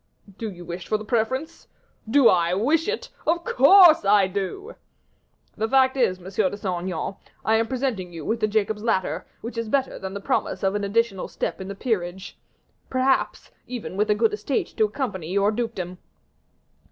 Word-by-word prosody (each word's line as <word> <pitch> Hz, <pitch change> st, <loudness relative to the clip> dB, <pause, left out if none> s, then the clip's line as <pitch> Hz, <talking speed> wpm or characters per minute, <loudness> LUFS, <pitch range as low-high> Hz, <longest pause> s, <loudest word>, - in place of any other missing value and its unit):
"Do 225 Hz, -, -3 dB
you 175 Hz, -3 st, -10 dB
wish 175 Hz, +1 st, -7 dB
for 215 Hz, -, +1 dB
the 215 Hz, -, -9 dB
preference?" 245 Hz, +7 st, -2 dB, 0.4 s
"Do 270 Hz, 0 st, +6 dB
I 175 Hz, 0 st, +3 dB
wish 300 Hz, -, +1 dB
it? 450 Hz, +2 st, -3 dB, 0.2 s
Of 340 Hz, +1 st, +1 dB
course 335 Hz, -, +7 dB
I 200 Hz, 0 st, +5 dB
do." 200 Hz, -, -4 dB, 0.8 s
"The 220 Hz, -, -1 dB
fact 260 Hz, +1 st, +4 dB
is, 220 Hz, -9 st, +1 dB
Monsieur 190 Hz, +2 st, -1 dB
de 205 Hz, -, -7 dB
Saint 185 Hz, -4 st, -2 dB
Aignan, 185 Hz, +2 st, -3 dB, 0.3 s
I 220 Hz, 0 st, +4 dB
am 225 Hz, 0 st, +1 dB
presenting 245 Hz, -9 st, -2 dB
you 165 Hz, -3 st, -8 dB
with 225 Hz, +1 st, -1 dB
a 215 Hz, -, +3 dB
Jacob's 210 Hz, 0 st, 0 dB
ladder, 185 Hz, -7 st, -1 dB
which 230 Hz, 0 st, -5 dB
is 230 Hz, -1 st, -4 dB
better 270 Hz, +2 st, 0 dB
than 190 Hz, +1 st, -6 dB
the -, -, -3 dB
promise 200 Hz, -, -1 dB
of 190 Hz, 0 st, +2 dB
an 205 Hz, 0 st, -2 dB
additional 200 Hz, -1 st, 0 dB
step -, -, -4 dB
in 190 Hz, -, -6 dB
the 200 Hz, -, -6 dB
peerage 190 Hz, -5 st, -3 dB, 0.5 s
perhaps, 260 Hz, +1 st, 0 dB, 0.2 s
even 245 Hz, -6 st, -6 dB
with 210 Hz, +2 st, 0 dB
a 210 Hz, -, +4 dB
good 225 Hz, 0 st, +2 dB
estate 215 Hz, +6 st, -2 dB
to 220 Hz, -, +4 dB
accompany 210 Hz, -, -4 dB
your 200 Hz, +2 st, +2 dB
dukedom." 210 Hz, -6 st, -4 dB
215 Hz, 185 wpm, -24 LUFS, 190-250 Hz, 0.8 s, course